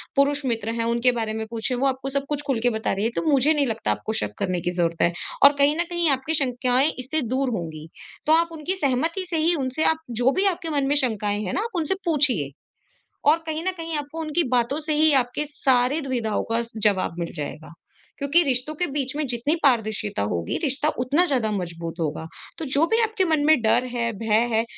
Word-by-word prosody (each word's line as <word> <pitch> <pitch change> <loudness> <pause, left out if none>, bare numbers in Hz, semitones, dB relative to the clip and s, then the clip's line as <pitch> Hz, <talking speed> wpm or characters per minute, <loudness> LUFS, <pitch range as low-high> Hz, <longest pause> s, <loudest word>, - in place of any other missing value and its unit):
पुरुष 280 0 +2
मित्र 225 -2 -2
हैं 230 - +1
उनके 235 +2 +3
बारे 220 -1 -2
में 220 0 -4
पूछें 230 +2 -2
वो 270 +3 +1
आपको 265 0 -3
सब 280 0 -2
कुछ 295 -1 -2
ख़ुल 255 -5 0
के 245 - +4
बता 220 -2 -2
रही 195 +1 -2
हैं। 230 - 0
तो - - -1
मुझे 280 +2 +4
नहीं 290 -3 +1
लगता 225 -1 -2
आपको 220 - -3
शक 105 0 -4
करने 180 -2 -1
की 175 - -2
ज़रूरत 170 -2 -1
है 170 - +3 0.3
और 280 +1 +9
कहीं 285 +2 +4
न 345 - +1
कहीं 345 -2 +1
आपकी 275 +4 +1
शंकाएँ 255 -1 +3
इससे 285 +5 -1
दूर 270 -1 0
होंगी। 160 -2 -7 0.4
तो 310 - +4
आप 335 +1 +3
उनकी 325 +4 -2
सहमति 325 +4 0
से 330 - 0
ही 330 +2 +3
उनसे 270 +1 -1
आप 320 - +3
जो 245 +3 +2
भी 385 +1 +1
आपके 355 -3 -1
मन 280 -1 +1
में 290 - +2
शंकाएँ 210 -6 0
हैं 185 - -4
ना - - 0
आप 460 -3 -7
उनसे 340 +2 0
पूछिए। 270 - +2 0.8
और 315 - +5
कहीं 315 0 -3
न 375 - +2
कहीं 330 -1 -4
आपको 295 +2 -6
उनकी 315 +2 +1
बातों 250 +3 +1
से 310 0 -1
ही 310 0 +5
आपके 250 +4 -1
सारे 265 0 +1
दुविधाओं 240 -6 -2
का 230 - +2 0.2
जवाब 190 -5 +2
मिल 170 -1 -4
जाएगा 155 +2 -7 0.5
क्योंकि 280 +5 +4
रिश्तों 270 +1 0
के 355 - +2
बीच 270 -1 -1
में 305 - -1
जितनी 245 +6 0
पारदर्शिता 220 - +1
होगी 85 -1 -2
रिश्ता 290 +1 +1
उतना 285 +8 +2
ज़्यादा 250 -9 0
मज़बूत 170 -3 -5
होगा। 160 0 -3 0.3
तो 320 - -4
जो 305 +4 +4
भी 450 +1 +1
आपके 440 -4 0
मन 310 -3 +1
में 310 -6 +5
डर 230 +3 +3
है 235 -1 -1
भय 225 +1 +2
है 220 +1 +2
265 Hz, 225 wpm, -23 LUFS, 225-310 Hz, 0.8 s, और